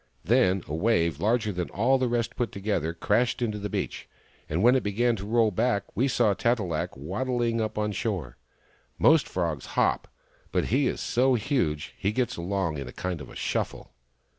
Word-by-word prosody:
Then 95 -2 +3
a - - -5
wave 85 -4 +1
larger 110 +2 +1
than 90 -2 -3
all 125 +7 +2
the 130 - +1
rest 120 0 -1
put 120 -5 -1
together 100 -5 -1
crashed 105 +8 +1
into 110 -4 -1
the 105 0 -4
beach, - - -4 0.4
and 85 +6 0
when 125 +2 +6
it 130 - +3
began 115 +4 +1
to 100 +1 -6
roll 115 -1 +3
back 100 +2 +1
we 130 - +2
saw 120 -5 +3
Tat 120 +4 +1
e - - -2
lak 85 -7 -3
waddling 115 - -1
up 110 0 -2
the 105 0 -1
shore. 95 - -3 0.6
Most 160 -2 +5
frogs 85 -6 -2
hop, - - +2 0.4
but - - +1
he 135 0 +3
is - - -2
so 130 +1 +2
huge 105 - -1
that - - -23
he 100 - +1
gets 125 +1 0
along 85 -3 -2
in 70 - -6
a - - -7
kind 90 0 -4
of 65 - -9
shuffle." - - -3
105 Hz, 195 wpm, -27 LUFS, 90-120 Hz, 0.6 s, when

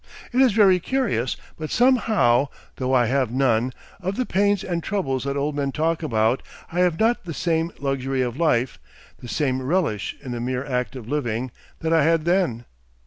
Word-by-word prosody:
It 255 - +4
is 260 -3 +5
very 195 -4 +5
curious, 180 - -1 0.2
but 155 -1 -4
somehow, 220 - +3 0.3
though 130 0 -1
I 125 -2 +4
have 130 0 +1
none, 125 -1 +1 0.3
of 190 +2 -2
the 255 - -1
pains 200 -1 +1
and 175 -3 -2
troubles 150 -11 -2
that 140 0 -2
old 145 +1 -1
men 140 -1 -1
talk 160 +3 0
about, 115 -4 +1 0.3
I 175 - -2
have 180 -3 +2
not 225 -2 +2
the 165 -3 -5
same 165 -1 0
luxury 135 -1 -1
of 120 -1 -3
life 130 -6 +1 0.4
the - - -10
same 130 -2 0
relish 135 - -1
in 130 - -8
the 120 -1 -3
mere 125 +2 -2
act 125 -1 -2
of 120 -4 -8
living 125 -3 -2 0.3
that 160 0 0
I 160 -3 +4
had 165 0 +2
then. 170 -10 +1
145 Hz, 190 wpm, -23 LUFS, 125-180 Hz, 0.4 s, is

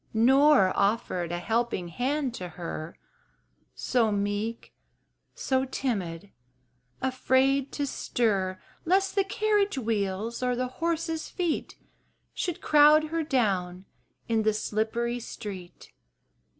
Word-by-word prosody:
Nor 260 -3 +5
offered 200 -4 0
a 175 - -1
helping 220 -1 -1
hand 260 - -1
to 180 -6 -6
her 165 -1 -7 0.8
So 230 -4 +1
meek, 205 +3 -2 0.6
so 260 -1 0
timid, 205 -9 -3 0.7
afraid 265 +1 +2
to 290 - -1
stir 200 -8 -1 0.2
Lest 385 +3 +2
the 395 - +2
carriage 410 -2 +1
wheels 220 -1 -2
or 250 -1 +1
the 255 +1 -1 0.2
horses' 330 -1 -1
feet 350 -4 -2 0.6
Should 350 -3 -3
crowd 305 +1 +5
her 330 +1 -1
down 195 - 0 0.4
in 225 -2 +2
the 215 0 +2
slippery 225 +3 -1
street. 200 -6 -9
235 Hz, 110 wpm, -27 LUFS, 200-290 Hz, 0.8 s, Nor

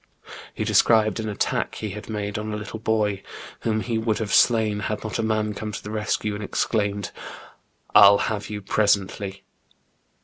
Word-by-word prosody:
He - - -2
described 110 -1 +3
an 110 -1 -3
attack 105 - -1
he 105 -2 -4
had 105 +3 -8
made 105 -1 -3
on 110 0 -4
a - - -3
little 105 +1 -7
boy 105 -3 0 0.4
whom 110 -1 -1
he 115 -1 -1
would 110 -1 0
have 110 -2 -3
slain, 110 -3 +4
had 105 0 -3
not 110 +1 -4
a - - +2
man 110 -1 0
come 105 +1 -5
to 100 - -7
the 105 - -7
rescue, 105 0 -1
and 105 +1 -5
exclaimed, 100 -1 -1 0.4
" - - -39 0.3
I'll 100 0 +9
have 105 -1 -2
you 105 -1 -5
presently.'' 100 -1 0
105 Hz, 180 wpm, -24 LUFS, 105-110 Hz, 0.4 s, I'll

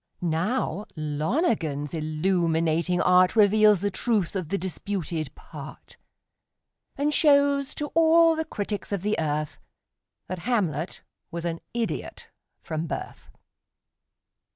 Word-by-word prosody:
Now, 190 +6 -1
Lonergan's 155 - -1
illuminating 165 +1 +1
art 180 +2 +4
Reveals 210 -2 +5
the 205 0 0
truth 205 -4 0
of 180 -5 -3
the 200 - 0
disputed 175 -5 -4
"part," 150 -2 -11 1.0
And 290 +2 0
shows 280 -2 +3
to 295 0 -4
all 330 0 +5
the 320 - -1
critics 205 - -4
of 200 -3 -2
the 210 +1 +1
earth 150 -2 -2 0.7
That 185 0 -4
Hamlet 175 - -1 0.3
was 170 -1 -5
an 165 -1 -3
idiot 235 -2 -4 0.3
from 160 0 -3
birth! - - -6
185 Hz, 110 wpm, -26 LUFS, 160-225 Hz, 1.0 s, Reveals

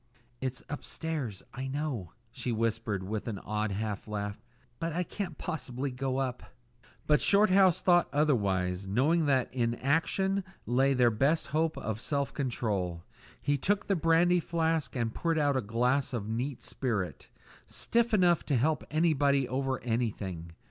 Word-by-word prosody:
"It's 130 -1 -3
upstairs, 145 - -4
I 130 +1 -4
know," 135 - -3 0.2
she 125 - -4
whispered, 115 -3 -1
with 105 +4 -4
an 110 -4 -3
odd 105 +1 -2
half 105 +1 -3
laugh; 105 -1 -4 0.4
"but 165 0 -2
I 180 +2 0
can't 180 -3 -5
possibly 135 -5 -3
go 130 +1 -2
up." 130 -2 -2 0.6
But 150 -1 +4
Shorthouse 195 -3 +5
thought 175 -1 +4
otherwise, 100 -10 +1
knowing 145 - +2
that 130 -3 +1
in 120 -2 0
action 190 +9 +1 0.2
lay 135 +3 +3
their 125 -2 +4
best 140 +9 +2
hope 160 +2 0
of 110 0 -4
self 140 0 -1
control. 100 -10 -2 0.4
He 145 0 0
took 205 +8 +1
the 195 - +1
brandy 170 +2 +4
flask 165 -3 -1
and 115 -2 -1
poured 165 -1 0
out 145 -2 +2
a 130 - +2
glass 125 +5 +1
of 110 -4 -3
neat 120 +4 -3
spirit, 110 -9 -3 0.4
stiff 235 0 +1
enough 180 -5 +4
to 140 - +1
help 150 +6 +1
anybody 145 -4 +2
over 130 +1 -1
anything. 100 -8 -3
135 Hz, 150 wpm, -30 LUFS, 115-160 Hz, 0.6 s, Shorthouse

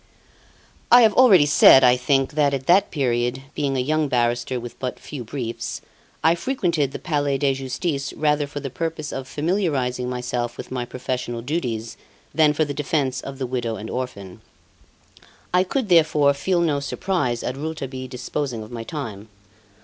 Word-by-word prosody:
I 245 0 +9
have 220 -2 +5
already 200 - +6
said, 135 -2 +7
I 125 0 +6
think, 135 +2 +1
that 145 -2 +2
at 135 -1 -6
that 185 +5 +4
period, 125 -2 -1
being 140 -2 -1
a - - +1
young 155 +3 +1
barrister 120 0 0
with 120 0 -9
but 130 -1 -4
few 140 -5 -7
briefs, 115 0 -5 0.4
I 160 - +5
frequented 170 - -1
the - - -5
Palais 145 -5 -1
de 135 0 +2
Justice 135 +2 -3
rather 150 -1 +1
for 145 0 -6
the 135 -2 -6
purpose 160 0 -4
of 135 -1 -5
familiarising 145 -8 -1
myself 125 -1 -3
with - - -8
my 125 -1 -2
professional 125 -1 -4
duties 120 -6 -3 0.4
than 150 0 +4
for 155 +1 +1
the 145 - -4
defence 135 -3 -1
of 135 0 -8
the 130 - -3
widow 120 -2 -2
and 110 +1 -7
orphan. 100 -8 -6 1.1
I 180 0 +5
could, 235 +5 -2
therefore, 155 -5 +4
feel 175 +5 0
no 155 -4 +1
surprise 140 -5 -2
at 125 - -3
Rouletabille 135 -3 -5
disposing 125 -1 -4
of 110 - -12
my 115 -1 -5
time. 110 -7 -6
135 Hz, 170 wpm, -22 LUFS, 125-155 Hz, 1.1 s, I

